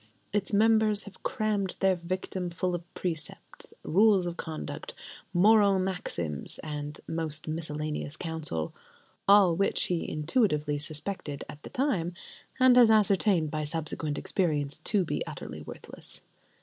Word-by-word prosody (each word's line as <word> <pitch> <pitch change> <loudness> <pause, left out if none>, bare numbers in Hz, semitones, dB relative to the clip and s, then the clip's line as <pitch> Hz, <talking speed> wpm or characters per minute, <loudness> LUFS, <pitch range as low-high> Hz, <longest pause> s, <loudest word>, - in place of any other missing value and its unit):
Its 205 -2 0
members 215 0 +4
have 200 -2 -13
crammed 210 -5 -1
their 190 -1 +3
victim 180 +1 -3
full 180 +1 -2
of 175 0 -5
precepts, 165 -4 -5
rules 200 +1 +4
of 175 -1 -3
conduct, 155 -3 -6 0.4
moral 200 +2 +5
maxims, 180 - -2
and 150 -1 -5
most 160 -2 -2
miscellaneous 155 -1 -3
counsel: 155 - -3 0.5
all 195 -4 +7
which 195 +3 +2
he 175 -2 -1
intuitively 150 - +1
suspected 150 0 -2
at 145 - -10
the - - -9
time, 230 - 0 0.4
and 255 -1 +6
has 240 -2 +8
ascertained 200 -6 +3
by 155 -1 -2
subsequent 155 -1 -1
experience, 150 -6 -1
to 200 -4 +1
be - - -2
utterly - - -7
worthless. - - -6
175 Hz, 130 wpm, -29 LUFS, 155-200 Hz, 0.5 s, has